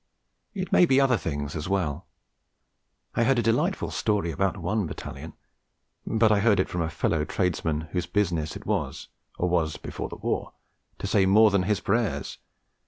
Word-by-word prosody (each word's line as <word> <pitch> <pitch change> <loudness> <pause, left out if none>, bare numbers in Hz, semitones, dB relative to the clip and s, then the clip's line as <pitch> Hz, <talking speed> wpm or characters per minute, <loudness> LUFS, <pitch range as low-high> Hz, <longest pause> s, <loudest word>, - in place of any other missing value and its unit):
It 185 -1 -4
may 180 - +6
be 135 -2 +4
other 135 -2 +4
things 75 -6 -4
as 80 +3 -4
well. 85 -4 -1 1.1
I 120 - +2
heard 130 +2 +3
a 120 - +2
delightful 115 +1 +1
story 100 -5 0
about 95 +6 0
one 95 +2 -1
Battalion 75 - -8 0.7
but 110 -1 +3
I 105 - +4
heard 105 -2 +3
it 95 - +2
from 90 - -2
a 80 - -1
fellow 80 -1 0
tradesmen 80 -2 -1
whose 90 -2 -2
business 85 -7 0
it - - -8
is - - -2 0.3
(or 90 - 0
was, 85 -3 0
before - - -6
the - - -7
war) - - -3 0.4
to - - -6
say 95 -2 +3
more 105 +2 +6
than 100 -1 +3
his 100 +1 0
prayers. 110 +1 -1
95 Hz, 175 wpm, -26 LUFS, 80-110 Hz, 1.1 s, may